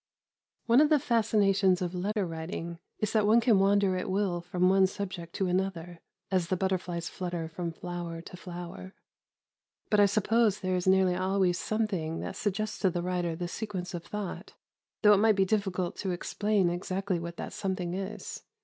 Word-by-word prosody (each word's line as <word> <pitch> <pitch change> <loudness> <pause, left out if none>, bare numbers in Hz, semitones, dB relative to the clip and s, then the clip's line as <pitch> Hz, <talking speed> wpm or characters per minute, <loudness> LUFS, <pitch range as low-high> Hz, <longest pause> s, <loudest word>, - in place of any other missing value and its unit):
One 240 +4 +6
of 300 - +4
the 305 - +5
fascinations 205 -7 +3
of 180 -1 -3
letter 200 +3 -1
writing 165 0 -5 0.2
is 215 - -2
that 215 -2 +3
one 225 +2 +6
can 225 -4 +4
wander 195 -1 +3
at 180 - -3
will 185 -3 0
from 180 +1 +1
one 190 0 +5
subject 185 -3 -6
to 195 - 0
another, 175 -2 -2 0.3
as 185 -3 +1
the 185 - 0
butterflies 180 -2 -1
flutter 175 -3 -4
from 170 +1 -4
flower 175 0 -6
to 175 - -10
flower; 180 +1 -8 1.0
but 210 - +4
I 205 - +7
suppose 215 +1 +2
there 185 0 0
is 180 0 -2
nearly 190 -1 +4
always 185 -1 +1
something 190 -8 -1
that - - -5
suggests 215 +1 -2
to 195 - +3
the 175 0 -2
writer 175 -2 -1
the 175 +1 -4
sequence 185 -2 -5
of 170 -1 -5
thought, 210 +1 -6 0.5
though 210 0 +8
it - - +5
might 220 0 +4
be 195 -1 +3
difficult 190 -3 -1
to 195 - -3
explain 190 +1 +1
exactly 185 +1 -2
what 170 0 -6
that - - -6
something 185 -3 -2
is. 195 +3 -5
185 Hz, 180 wpm, -29 LUFS, 175-205 Hz, 1.0 s, though